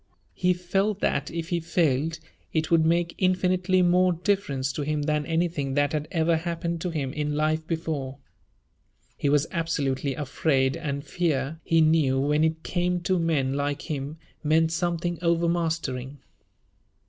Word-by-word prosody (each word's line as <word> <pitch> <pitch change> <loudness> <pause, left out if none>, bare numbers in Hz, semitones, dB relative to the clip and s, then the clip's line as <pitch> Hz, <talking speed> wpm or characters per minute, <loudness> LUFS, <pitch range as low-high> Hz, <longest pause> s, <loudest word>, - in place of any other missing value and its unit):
He 180 0 +2
felt 195 +3 0
that 140 - 0
if 165 0 -5
he 175 -2 0
failed 160 -2 +1 0.3
it 160 0 -1
would 165 -1 +5
make 170 +1 +1
infinitely 185 0 +2
more 180 +1 +4
difference 165 -8 -1
to - - -3
him 150 0 -1
than 150 0 0
anything 165 -5 -1
that 145 0 +2
had 150 0 -2
ever 165 -1 +2
happened 170 0 -3
to 180 - -1
him 145 -5 -3
in 150 -1 -2
life 155 +1 0
before. 155 -5 -3 1.0
He 145 - 0
was 145 +1 +3
absolutely 140 -5 -1
afraid, 135 -1 +1
and 140 -4 -4
fear, 160 -3 -1
he 165 0 +3
knew, 155 -4 +3
when 150 +3 +2
it 160 0 0
came 180 0 0
to 185 +1 +1
men 150 -6 +1
like 145 +3 -2
him, 145 +1 -4 0.3
meant 160 +1 +3
something 175 0 -1
overmastering. 165 -6 0
160 Hz, 150 wpm, -26 LUFS, 145-170 Hz, 1.0 s, would